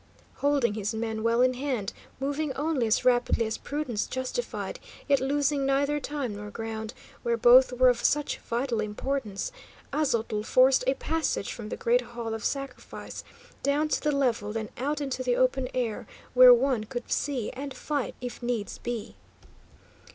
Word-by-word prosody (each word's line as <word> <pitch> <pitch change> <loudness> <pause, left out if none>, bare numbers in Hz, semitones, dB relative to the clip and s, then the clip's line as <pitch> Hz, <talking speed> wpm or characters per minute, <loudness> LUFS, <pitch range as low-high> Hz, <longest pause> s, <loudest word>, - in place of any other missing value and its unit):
Holding 280 -6 +2
his 210 +1 -2
men 220 -1 -2
well 230 +2 +3
in 255 0 +3
hand, 255 -6 -2 0.3
moving 285 +2 -1
only 290 -4 0
as 220 +3 +1
rapidly 245 -2 +3
as 220 - -3
prudence 280 -8 -2
justified, 260 - -4 0.3
yet 280 -2 +4
losing 285 +1 +1
neither 280 +2 +1
time 280 -6 -3
nor 210 0 -7
ground, 220 +2 -5 0.3
where 235 -1 0
both 250 +2 +7
were 255 +1 +5
of 245 -1 +3
such 295 0 +1
vital 235 0 -2
importance; 215 - -3 0.4
Aztotl 230 -8 0
forced 255 +3 +4
a 265 - +3
passage 320 -10 -1
from 220 -3 -7
the - - -4
great 245 +2 +3
Hall 235 -2 -5
of 225 -1 -5
Sacrifice 275 -2 -5 0.4
down 295 +2 +1
to - - 0
the 300 - +1
level, 245 -7 0
then 220 -1 -4
out 290 +4 -2
into 270 -2 -2
the 250 -1 +1
open 255 0 +2
air, 235 -4 -2 0.3
where 250 0 +10
one 245 -2 +3
could 245 +1 -6
see 265 -6 -1
and 275 +2 -6
fight 290 -1 -3
if 245 0 -6
needs 240 -4 -3
be. 235 - -5
250 Hz, 165 wpm, -28 LUFS, 230-280 Hz, 0.4 s, where